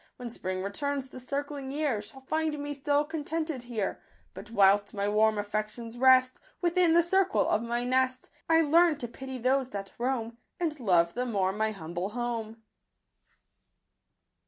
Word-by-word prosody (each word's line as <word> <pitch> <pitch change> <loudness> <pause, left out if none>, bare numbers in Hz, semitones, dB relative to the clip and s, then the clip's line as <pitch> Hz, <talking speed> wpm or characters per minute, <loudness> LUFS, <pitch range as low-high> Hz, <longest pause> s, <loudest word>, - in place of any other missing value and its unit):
When 245 -2 -6
spring 185 -3 -3
returns, 270 +7 -2
the 255 - -9
circling 280 +1 -4
year 285 -7 0
Shall 265 +6 -12
find 315 +2 -1
me 290 0 -4
still 285 +1 +1
contented 315 -2 -3
here; 235 -5 -3 0.3
But 210 - -10
whilst 200 -1 +4
my 200 0 -1
warm 215 +1 +3
affections 215 +3 -4
rest 255 0 +5 0.2
Within 345 -1 +3
the 340 - +6
circle 380 +2 +2
of 215 - +2
my 235 +1 -2
nest, 255 +1 0 0.2
I 325 0 +6
learn 325 +1 +4
to 245 - -5
pity 265 +2 -7
those 260 +1 +1
that 195 -4 -6
roam, 235 -2 -2 0.2
And 315 -4 -2
love 175 -7 +3
the 250 +1 -2
more 190 -5 0
my 220 +1 0
humble 175 -1 -4
home." 225 -1 -4
250 Hz, 160 wpm, -29 LUFS, 215-285 Hz, 0.3 s, the